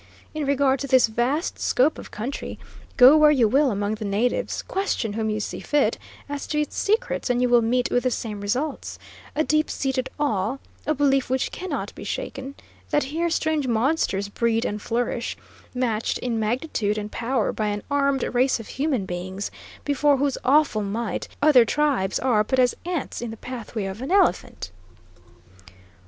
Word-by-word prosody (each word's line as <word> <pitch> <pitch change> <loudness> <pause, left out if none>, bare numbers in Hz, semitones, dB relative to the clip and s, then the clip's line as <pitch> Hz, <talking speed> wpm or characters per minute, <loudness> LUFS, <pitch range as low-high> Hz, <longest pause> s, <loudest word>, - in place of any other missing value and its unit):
In 305 -2 -3
regard 275 -1 +2
to 280 - -3
this 260 -2 +5
vast 245 - -1
scope 275 +5 +2
of - - -10
country, 240 +7 -5 0.4
go 255 +3 +9
where 305 -1 +7
you 260 -7 +4
will 275 +5 +3
among 205 -1 -1
the 220 0 -5
natives, 210 +5 -1
question 375 - -2
whom 220 0 -1
you 215 0 -1
see 210 - -4
fit, 295 -1 +1 0.3
as 285 0 -5
to 300 - -1
its 300 - -4
secrets, 425 - 0
and 245 -1 +2
you 250 - +3
will 240 -1 +5
meet 245 +2 +1
with 245 - +3
the 255 - +1
same 215 -4 -4
results: 260 +9 -2 0.4
a 310 - +2
deep 310 0 +1
seated 265 -1 -2
awe, 225 -3 0 0.3
a 310 - +2
belief 275 -2 +2
which 260 0 0
cannot 375 - -4
be - - -9
shaken, 270 +1 -5 0.3
that 295 - +2
here 330 +5 -1
strange 315 -3 0
monsters 230 -4 +1
breed 230 +2 0
and 210 0 -3
flourish, 235 +1 -2 0.4
matched 230 -3 0
in 235 -3 -2
magnitude 220 -2 -1
and 210 0 -4
power 240 -1 0
by 215 - -1
an 205 0 -2
armed 280 -1 +2
race 255 +1 +2
of 225 - -9
human 270 -7 -1
beings, 185 +2 -5 0.3
before 290 0 +3
whose 275 0 0
awful 280 -5 +3
might 210 +3 -3 0.2
other 290 -5 +7
tribes 270 -7 +1
are 235 -5 +2
but 260 +5 -1
as 250 -1 +4
ants 345 -9 -3
in 240 - -4
the 225 - -7
pathway 230 -4 -5
of 195 +4 -6
an 265 - -4
elephant." 355 - +1
250 Hz, 175 wpm, -24 LUFS, 220-285 Hz, 0.4 s, go